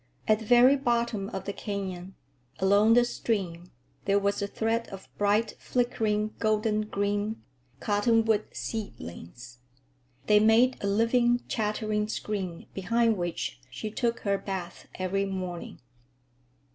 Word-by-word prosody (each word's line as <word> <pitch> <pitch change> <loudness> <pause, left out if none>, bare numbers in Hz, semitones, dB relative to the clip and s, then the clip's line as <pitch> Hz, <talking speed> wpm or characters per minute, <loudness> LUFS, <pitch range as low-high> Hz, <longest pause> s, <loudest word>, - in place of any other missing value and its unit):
At 215 0 +4
the 220 - -8
very 245 +4 +6
bottom 235 -6 0
of 190 - -6
the 200 - -3
canyon, 190 -3 -5 0.4
along 205 +4 +4
the 240 0 +5
stream, 180 -8 -3 0.4
there 200 0 +3
was 200 0 0
a 200 - -1
thread 225 +2 -1
of 195 -1 -10
bright, 210 +2 +2
flickering, 215 -4 0
golden 215 -1 +1
green,—cottonwood 205 - 0
seedlings. 120 - -7 0.7
They 210 -1 +5
made 225 +4 +4
a - - +1
living, 240 +4 +2
chattering 210 -1 -1
screen 195 -5 -4
behind 230 +4 +2
which 175 -7 -3
she 210 - -6
took 235 +1 -1
her 200 -1 0
bath 185 -3 -6
every 190 +2 -1
morning. 185 -3 -5
210 Hz, 120 wpm, -28 LUFS, 195-225 Hz, 0.7 s, very